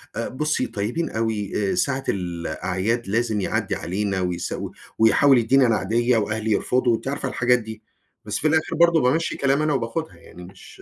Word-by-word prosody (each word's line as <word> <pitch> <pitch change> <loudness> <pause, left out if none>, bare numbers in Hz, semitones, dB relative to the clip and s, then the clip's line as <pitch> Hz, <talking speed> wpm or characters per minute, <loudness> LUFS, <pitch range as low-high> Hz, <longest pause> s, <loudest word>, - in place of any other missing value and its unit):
آآ 115 - -2
بُصّي 150 +4 -1
طيبين 120 +10 -3
أوي 105 -3 -2
آآ - - -1
ساعة 135 -1 0
الأعياد 95 +5 -2
لازم 110 0 0
يعدِّي - - -1
علينا 95 +1 -2
ويس 90 -1 -3
و - - -5 0.3
ويحاول 130 +4 +5
يدِّيني 130 +3 +4
أنا 115 - +3
عيدية 120 +4 +1
وأهلي 110 0 -1
يرفضوا، 125 +3 +2
أنتِ 115 - -7
عارفة 140 +1 -2
الحاجات 125 0 +2
دي، 110 -1 -9 0.4
بس 105 0 -2
في 155 - +1
الآخر 160 +1 +1
برضه 170 -1 +4
بامَشِّي 155 +7 +1
كلامي 140 +2 +1
أنا 155 -1 +1
وباخدها 135 +6 -3
يعني 90 - -14
مش 95 +2 -14
115 Hz, 180 wpm, -23 LUFS, 105-135 Hz, 0.4 s, ويحاول